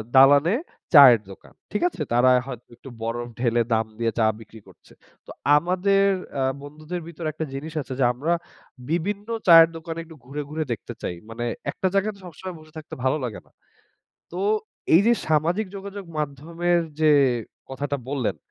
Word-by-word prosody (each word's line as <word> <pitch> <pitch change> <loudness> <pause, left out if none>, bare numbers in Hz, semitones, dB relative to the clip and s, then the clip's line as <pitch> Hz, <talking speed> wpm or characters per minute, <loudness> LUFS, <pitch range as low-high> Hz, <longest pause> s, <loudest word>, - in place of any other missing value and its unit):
দালানে 145 +8 +6 0.4
চায়ের 130 -7 +9
দোকান। - - -15 0.2
ঠিক 210 - -2
আছে? 180 - -10
তারা 125 +2 +5
হয়তো 125 -3 -8
একটু 135 - -12
বরফ 120 +1 -3
ঢেলে 120 -1 +2
দাম 110 0 +2
দিয়ে 115 -1 +1
চা 110 - +4
বিক্রি 110 0 -13
করছে। - - -19 0.3
তো - - -11 0.3
আমাদের 185 +4 +2 0.3
অ্যা 135 - -1 0.2
বন্ধুদের 155 +4 -7
ভিতরে 170 -1 -6
একটা 160 +1 -4
জিনিস 150 +3 -6
আছে 135 - -7
যে, 130 - +3
আমরা 150 +8 -1 0.6
বিভিন্ন 200 +6 -2 0.2
চায়ের 165 -1 +9
দোকানে 165 0 -6
একটু 160 -1 -14
ঘুরে, 140 +3 -5
ঘুরে 155 +1 -2
দেখতে 115 - -5
চাই। 90 - -3
মানে 115 +1 -4 0.3
একটা 190 - -1
জায়গায় 200 +2 0
সবসময় 180 +1 -8
বসে 155 0 -18
থাকতে 155 - -10
ভালো 130 +3 +2
লাগে 120 -4 -4
না। - - -28 0.9
তো 180 - -4 0.5
এই 170 - +8
যে, 235 - +6 0.2
সামাজিক 165 +7 +1
যোগাযোগ 200 0 -7
মাধ্যমের 165 +5 -1 0.2
যে, 155 -1 +5 0.6
কথাটা 140 +2 -3
বললেন 135 -5 -1
155 Hz, 165 wpm, -24 LUFS, 130-175 Hz, 0.9 s, চায়ের